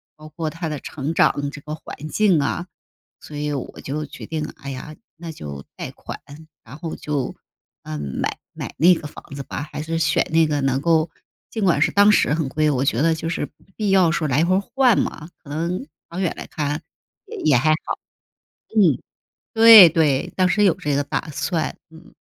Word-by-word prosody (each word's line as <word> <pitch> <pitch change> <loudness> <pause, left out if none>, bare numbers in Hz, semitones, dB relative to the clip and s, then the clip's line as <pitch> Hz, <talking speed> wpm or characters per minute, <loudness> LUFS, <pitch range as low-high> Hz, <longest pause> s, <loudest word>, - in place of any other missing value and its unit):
包 155 0 -13
括 155 +1 -3
他 165 -1 -4
的 150 -2 -4
成 150 +2 -4
长 145 0 +2
这 145 - -9
个 150 +1 -6
环 155 -1 -8
境 195 -5 +3
啊， 175 +5 -2 0.5
所 150 - -11
以 150 0 -2
我 135 - -6
就 150 +2 -4
决 - - -10
定， 155 -1 -3
哎 140 -1 -8
呀， 145 +3 -7 0.2
那 165 0 -8
就 70 - -8
贷 - - -5
款， - - -9 0.4
然 125 +6 -11
后 165 0 -5
就， 145 -3 -3 0.5
嗯， 75 -1 -5 0.2
买 - - -2 0.2
买 - - -7
那 175 +4 +6
个 155 -3 -4
房 - - -12
子 140 0 -5
吧， 145 +3 -6
还 - - -5
是 165 +1 -2
选 160 -1 +2
那 165 0 +5
个 145 -1 0
能 135 0 +1
够， 160 0 +2 0.4
尽 220 -3 -3
管 170 -5 +3
是 - - +3
当 205 +1 +6
时 150 - +3
很 155 -4 -1
贵， 155 +1 +1
我 135 -2 +1
觉 140 - +1
得 165 0 +3
就 165 +1 -4
是 145 -4 -3 0.3
必 210 -2 0
要 185 -4 +5
时 170 - -1
候 - - +1
来 140 +4 +2
回 185 +1 +3 0.2
换 260 -4 +5
嘛， 160 +1 -3
可 145 - -14
能 170 - -2 0.2
长 170 - -6
远 175 - 0
来 - - -6
看 150 +1 -3 0.5
也 - - -8
也 145 -5 +3
还 155 +6 +2
好。 155 - -1 0.8
嗯， 175 - +5 0.6
对， 225 -5 +11
对， 150 -5 +1
当 185 -1 +3
时 210 +2 +3
有 185 - +5
这 145 -1 -2
个 145 - +2
打 160 - -3
算， 165 +3 -2
嗯。 160 +1 -16
155 Hz, 220 characters per minute, -22 LUFS, 145-170 Hz, 0.8 s, 对